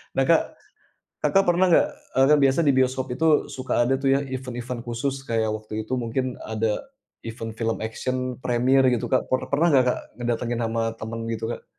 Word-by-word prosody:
Nah - - +3
Kak, - - +6 0.8
Kakak, 195 0 +3
pernah 180 +2 +4
nggak, 285 +12 +5 0.3
eee, 135 - +6
kan 150 - +6
biasa 135 +4 +3
di 140 - +5
bioskop 130 0 +1
itu 160 +5 -1 0.3
suka 130 0 -3
ada 125 +2 +2
tuh 135 - +1
ya 135 - +3
event-event 125 -1 -5
khusus 130 +4 -2
kayak 110 -1 +1
waktu 110 0 -12
itu 130 - -5
mungkin 130 +3 -1 0.2
ada, 110 0 0 0.6
event 115 0 -6
film 115 0 0
action 130 +3 -3 0.3
premiere 130 +2 +3
gitu 115 - -1
Kak, 130 - +4
per 130 - +2
pernah 165 +4 +4
nggak 130 -2 +6
Kak, - - 0 0.2
ngedatengin 120 0 -2
sama 115 0 -1 0.2
temen 115 +1 -6
gitu 110 0 -4
Kak? - - -10
125 Hz, 190 wpm, -24 LUFS, 115-135 Hz, 0.8 s, Kak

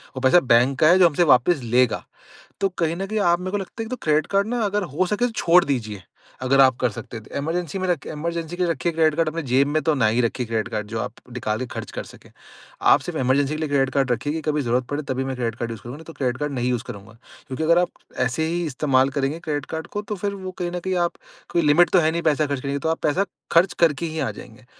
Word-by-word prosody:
वो 130 - -5
पैसा 130 +7 +6
बैंक 125 +3 +4
का 155 - +5
है 180 +3 +6
जो 175 - +8
हमसे 165 +4 +2
वापस 145 +2 +4
लेगा। 120 +1 +2 0.6
तो 195 - +2
कहीं 165 -1 +1
न 195 - -3
कहीं 215 +1 -1
आप 175 -3 +3
मेरे 185 +1 -4
को 205 - 0
लगता 190 -2 -7
है - - -3
कि - - -9
तो 255 - -2
क्रेडिट 155 -1 +2
कार्ड 200 +1 +1
ना 240 +1 -1
अगर 205 0 0
हो 185 +5 +1
सके 210 +6 0
छोड़ 175 -4 +4
दीजिए। 110 -8 -3 0.4
अगर 135 +2 +4
आप 130 -2 +5
कर 125 - +3
सकते 115 +2 -8
हैं 110 - -10
तो - - -12
इमरजेंसी 165 +4 -2
में 185 - -2
रखे 175 -5 -1
इमरजेंसी 170 +2 -4
के 180 - -1
लिए 170 - +1
रखिए 165 +3 -1
क्रेडिट 160 -2 +2
कार्ड। 165 -1 +1
अपने 165 +2 -4
जेब 135 +2 +2
में 155 +2 0
तो 160 - +2
ना 120 -6 +2
ही 115 +3 +2
रखिए 120 +1 -1
क्रेडिट 110 -1 -2
कार्ड 105 -1 -2
जो 110 +1 -4
आप - - -4 0.2
निकाल 110 -3 -2
के 130 - -2
खर्च - - -6
कर - - -5
सकें। - - -15 0.6
आप - - +6
सिर्फ़ - - -5
इमरजेंसी 135 +3 +2
के 155 - -4
लिए 155 -2 -2
क्रेडिट 135 -2 +2
कार्ड 135 -3 +1
रखिए 145 +6 -1
कि 160 - -3
कभी 150 -1 +1
ज़रूरत 125 0 0
पड़े 145 +1 -2
तभी 130 0 -1
मैं 135 -1 -3
क्रेडिट 115 -2 -2
कार्ड 115 -1 -3
यूज़ 110 -4 -8
करूँगा 120 +5 -8
नहीं 160 - -13
तो 165 - -10
क्रेडिट 130 -4 -2
कार्ड 150 0 -3
नहीं 125 -1 -1
यूज़ 120 -1 -1
करूँगा। 110 -3 -10 0.3
क्योंकि 130 +4 -4
अगर 170 +2 +4
आप 180 - +1 0.4
ऐसे 160 +6 -1
ही 170 +1 -1
इस्तेमाल 135 -2 +2
करेंगे 140 +4 -1
क्रेडिट 150 -4 -3
कार्ड 160 0 -4
को 205 - -4
तो 210 0 -5
फिर 200 +1 -3
वो 185 -1 -6
कहीं 175 0 -2
न 180 - -3
कहीं 185 +1 -2
आप - - -12 0.4
कोई 170 - +3
लिमिट 155 +3 +5
तो 185 - +4
है 160 -1 +2
नहीं 170 +1 -2
पैसा 155 -1 +2
खर्च 140 -2 -2
करने 140 0 -3
की, 140 - -1
तो 160 - -1
आप 165 - -1
पैसा 175 +7 +2 0.3
खर्च 175 +3 +4
करके 165 -1 +2
ही 160 -1 -4
आ - - -1
जाएँगे। 120 +1 -13
150 Hz, 285 wpm, -23 LUFS, 130-170 Hz, 0.6 s, जो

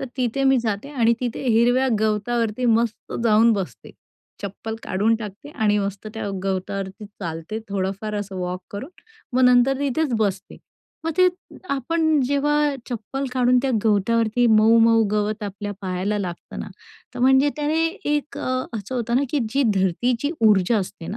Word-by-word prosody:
तर - - -2
तिथे 255 +1 -1
मी 270 0 +5
जाते 220 +2 -3
आणि 235 -5 +3
तिथे 245 -2 -3
हिरव्या 245 +3 +3
गवतावरती 220 +2 0
मस्त 230 -1 0
जाऊन 225 +1 +5
बसते. 195 -4 -5 0.5
चप्पल 205 +3 -5
काढून 210 +5 +1
टाकते 215 +5 -9
आणि 210 -6 +1
मस्त 200 +1 -4
त्या 220 -2 -4 0.2
गवतावरती 195 +2 -3
चालते 180 -1 -6
थोडंफार 200 +2 -3
असं 205 -2 -4
वॉक 180 0 -3
करून. 230 +9 -7 0.4
मग 255 - +2
नंतर 250 +2 +4
तिथेच 285 +1 0
बसते. 200 -2 -2 0.5
मग 325 - -1
ते 365 0 +7 0.4
आपण 315 +3 +1
जेव्हा 295 +1 +1 0.2
चप्पल 245 +4 -4
काढून 250 -1 +3
त्या 270 - 0
गवतावरती 225 +3 +2
मऊ-मऊ 225 +1 +5
गवत 210 +1 -1
आपल्या 205 +1 -5
पायाला 190 +2 -2
लागतं 180 -4 -6
ना, - - -6 0.5
तर - - -6
म्हणजे 265 +3 +5
त्याने 300 +1 0
एक 300 -5 -3
अ, - - -3 0.3
असं 210 +4 -6
होतं 235 -1 0
ना, 265 - +3
की 295 - +1
जी 275 +4 +2
धरतीची 230 - 0 0.2
ऊर्जा 210 +1 +4
असते 190 -3 -6
ना, 210 - -5
225 Hz, 155 wpm, -22 LUFS, 200-260 Hz, 0.5 s, ते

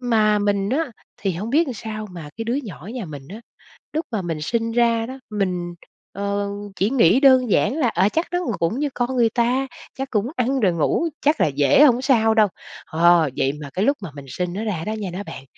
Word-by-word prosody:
Mà 215 -4 +3
mình 200 0 0
á, 295 +1 0 0.3
thì 195 -2 -2
hông 205 +7 -4
biết 320 +5 +3
làm 260 - -4
sao 215 0 -6
mà 165 -4 -8
cái 225 - -4
đứa 235 +2 -1
nhỏ 185 -1 -9
nhà 245 -5 -4
mình 145 -4 -9
á, 210 +4 -9 0.5
lúc 315 +2 -1
mà 215 -4 -1
mình 165 -3 -4
sinh 230 +7 -1
ra 230 -1 +2
đó, 260 +3 -8
mình, 180 -4 -2 0.4
ờ, 200 0 -2 0.3
chỉ 195 +3 +1
nghĩ 245 -3 +4
đơn 260 -4 +5
giản - - +3
là, 265 -7 +2
à, 190 -1 +2
chắc 325 +9 0
nó 355 - +1 0.2
cũng 170 +10 0
như 295 0 0
con 245 +1 -1
người 235 -2 +4
ta, 250 +3 +1 0.3
chắc 270 0 -4
cũng 210 -2 0
ăn 260 +2 0
rồi 195 -7 +3
ngủ 170 - +1
chắc 295 +2 +2
là - - +4
dễ 140 - +4
hổng 250 -4 +5
sao 230 -5 +3
đâu. 215 -1 +5 0.4
Ờ, 170 -1 +4
vậy 135 - +2
mà 145 - -7
cái 195 +6 0
lúc 280 +1 +2
mà 185 -6 -7
mình 140 -1 -9
sinh 175 +6 -3
nó 205 +4 -3
ra 190 -7 -2
đó 215 - -2
nha 210 -3 -4
đó 195 - -4
bạn, - - -8
215 Hz, 235 wpm, -22 LUFS, 180-250 Hz, 0.5 s, đơn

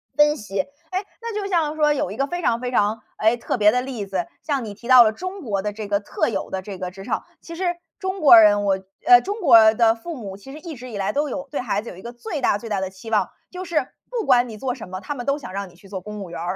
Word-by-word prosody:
分 295 0 +4
析。 200 -3 -2 0.3
哎， 375 +2 -2 0.2
那 465 -1 -5
就 415 -1 -2
像 320 -5 +1
说 300 -1 +3
有 225 -9 -2
一 210 - -7
个 275 - 0
非 350 +4 -4
常 235 -7 +1
非 250 0 -3
常， 215 -2 +1 0.2
哎， 220 +2 +3
特 240 - -3
别 210 -1 +5
的 250 +2 +1
例 250 -6 -5
子。 190 -3 -2 0.2
像 280 -4 -1
你 210 -2 -6
提 235 +4 -12
到 255 -2 +9
了 215 - +3
中 370 - -6
国 205 - -2
的 205 +1 -3
这 210 -1 -6
个 200 -1 +2
特 200 - -1
有 - - -3
的 190 - -3
这 195 0 -8
个 180 -1 -5
职 195 +1 -10
场， - - -2 0.2
其 335 - -9
实 350 0 -1 0.2
中 380 0 -3
国 275 -6 +9
人， 205 -1 +5
我 195 -1 +1 0.3
呃， 365 +1 +9
中 410 +3 -4
国 225 - +7
的 225 0 +4
父 320 +8 -7
母 200 -6 -7
其 270 +7 -12
实 305 - -9
一 320 -1 -8
直 250 +1 -9
以 220 - -6
来 195 -1 0
都 290 +2 0
有 275 +1 -5
对 290 - -2
孩 210 -4 -1
子 235 - -9
有 - - -10
一 - - -11
个 235 +4 -8
最 245 +5 -5
大 205 - +2
最 225 +2 -9
大 205 -2 0
的 190 0 -3
期 190 +4 -11
望， 215 - +1 0.2
就 370 +1 -6
是 310 -5 0 0.2
不 475 -5 -2
管 250 -2 +4
你 220 -2 -8
做 250 +3 -2
什 225 - -9
么， 185 +1 -6
他 290 - -4
们 245 -4 -6
都 280 +1 +1
想 285 - -9
让 200 0 -4
你 180 - -20
去 195 +3 -18
做 190 -1 -4
公 210 +2 -8
务 190 - -7
员 170 - -7
儿。 175 +3 -2
235 Hz, 325 characters per minute, -22 LUFS, 205-295 Hz, 0.3 s, 到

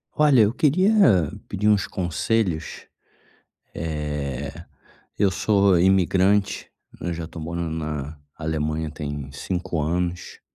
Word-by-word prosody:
Olha, 145 -5 +5
eu 105 +2 +3
queria 160 +9 +3 0.6
pedir 105 +1 0
uns 100 -2 +3
conselhos. 90 0 -2 0.9
Eh, 75 -4 -3 0.7
eu 100 -1 +3
sou 100 -1 +3
imigrante, 95 +2 +2 0.3
eu 90 - -2
já 85 -1 -5
tô 80 0 -9
morando 85 +1 -3
na 75 -2 -4 0.2
Alemanha 80 0 -2
tem 75 -2 -6
5 90 +2 -3
anos, 90 +3 -2
85 Hz, 110 wpm, -23 LUFS, 75-100 Hz, 0.9 s, Olha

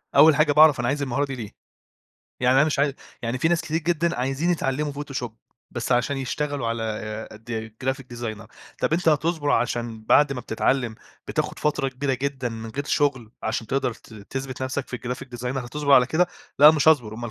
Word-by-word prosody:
أول 150 +1 +8
حاجة 155 0 +3
باعرف 150 -2 +6
أنا 120 - 0
عايز 145 +3 0
المهارة 140 +1 0
دي 135 -1 -5
ليه؟ 110 -4 -7 0.9
يعني 125 +1 +4
أنا 140 - +6
مش 150 -3 -1
عاي 140 -1 +2 0.3
يعني 120 +2 -2
في 160 - +2
ناس 175 0 +2
كتير 160 -1 -3
جدًا 170 0 0
عايزين 135 +7 0
يتعلّموا 145 -2 -1
فوتوشوب 135 -6 -5 0.3
بس 120 0 -2
عشان 130 +3 +1
يشتغلوا 135 0 -2
على 110 -1 -4
د 110 0 -6
graphic 130 0 -1
designer 110 -2 -5 0.3
طب - - 0
أنت 170 0 +2
هتصبر. 155 -1 +1
عشان 115 -2 -1
بعد 145 +4 +5
ما 130 - -4
بتتعلّم 120 +1 0 0.3
بتاخد - - -2
فترة 145 -2 0
كبيرة 135 +1 -2
جدًا 130 -1 -2
من 115 0 -7
غير 140 +4 -4
شُغل 135 -7 0
عشان 110 0 -2
تقدر 135 0 0
ت 110 - -16
تثبت 130 +5 -6
نفسك 130 +1 -3
في 125 - -4
الgraphic 125 +1 -5
designer 125 +2 -2
هتصبرعلى 140 -1 +4
كده؟ 170 +6 +2 0.3
لأ، 150 +2 +10
مش 155 -1 +3
هاصبر 120 -9 +3
أُمَّال 120 +1 -6
135 Hz, 190 wpm, -24 LUFS, 120-145 Hz, 0.9 s, لأ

